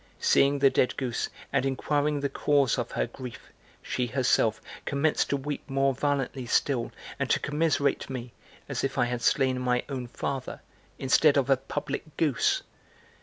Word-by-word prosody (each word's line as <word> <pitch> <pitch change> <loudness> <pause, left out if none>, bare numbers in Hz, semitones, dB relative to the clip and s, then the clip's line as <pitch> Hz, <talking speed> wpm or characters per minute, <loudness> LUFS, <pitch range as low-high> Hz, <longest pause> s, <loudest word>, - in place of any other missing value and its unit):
Seeing 140 +1 +4
the 135 -1 +5
dead 125 - +1
goose 125 -4 -2 0.2
and - - +2
inquiring 145 +2 0
the 140 - +1
cause 140 -2 +2
of 120 - -4
her - - +1
grief, 125 0 -10 0.3
she 125 - -1
herself 120 -3 +2 0.2
commenced 145 +2 +1
to 140 - +1
weep 145 +1 -4
more 135 0 +2
violently 135 -2 -1
still 125 -1 +1 0.3
and - - -1
to - - +3
commiserate 145 -1 0
me, 125 -2 -6 0.3
as 135 -3 -3
if 135 0 -2
I 125 - +4
had 120 0 -3
slain 130 +1 +2
my 125 -1 +1
own 130 -3 -4
father, 130 +2 -4 0.4
instead 140 +2 +4
of 135 0 +2
a 135 - +6
public 145 +2 -5
goose. 150 -7 +2
135 Hz, 165 wpm, -28 LUFS, 125-145 Hz, 0.4 s, a